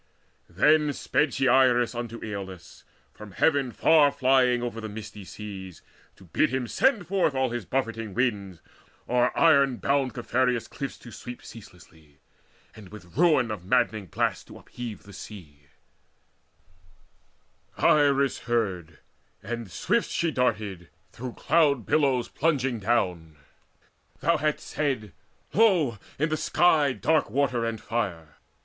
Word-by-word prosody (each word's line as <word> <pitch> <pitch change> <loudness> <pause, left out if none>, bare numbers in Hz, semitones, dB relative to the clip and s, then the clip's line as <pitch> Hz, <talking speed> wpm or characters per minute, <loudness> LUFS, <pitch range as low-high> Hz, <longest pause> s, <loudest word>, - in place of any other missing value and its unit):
Then 150 - +3
sped 150 0 0
she 135 -1 +1
Iris 125 -1 +4
unto 120 -1 -5
Acolus, 95 -4 -8 0.3
From 105 -2 -12
heaven 140 -5 +2
far 150 +2 +4
flying 130 -3 +2
over 115 -2 -4
misty 105 -1 -9
seas, 95 -3 -9 0.3
To - - -18
bid 95 - +1
him 130 -1 -2
send 225 - +2
forth 180 -6 +1
all 130 -2 0
his 120 -5 -5
buffering 115 -5 -3
winds 100 -8 -1 0.5
O'er 125 0 +2
iron 140 -6 +4
bound 135 -2 0
Caphereus' 125 0 0
cliffs 140 -2 -6
to 120 - -13
sweep 125 +1 -9
Ceaselessly, 80 -9 -15 0.6
and 105 -4 -13
with 95 -4 -13
ruin 150 -8 +3
of 105 -4 -6
madding 110 -1 +1
blasts - - -1
To - - -13
upheave 120 -4 -8
the 100 - -14
sea. 80 -8 -12 2.1
And - - -1
Iris 140 -2 +3
heard, 95 - -2 0.5
and 115 -3 -5
swift 235 - 0
She 170 -1 0
darted, 105 - -2 0.2
through 125 0 -7
cloud 145 -7 +2
billows 135 -5 +2
plunging 135 -6 0
down 90 -7 -1 0.9
Thou 170 +2 +2
hadst 155 -1 -1
said: 130 -9 -2 0.4
"Lo, 175 - +3 0.2
in 155 +3 0
the 155 - -1
sky 155 -5 +3
dark 155 +4 +1
water 130 -3 0
and 115 -1 -3
fire!" 85 -11 -4
120 Hz, 130 wpm, -26 LUFS, 105-140 Hz, 2.1 s, Iris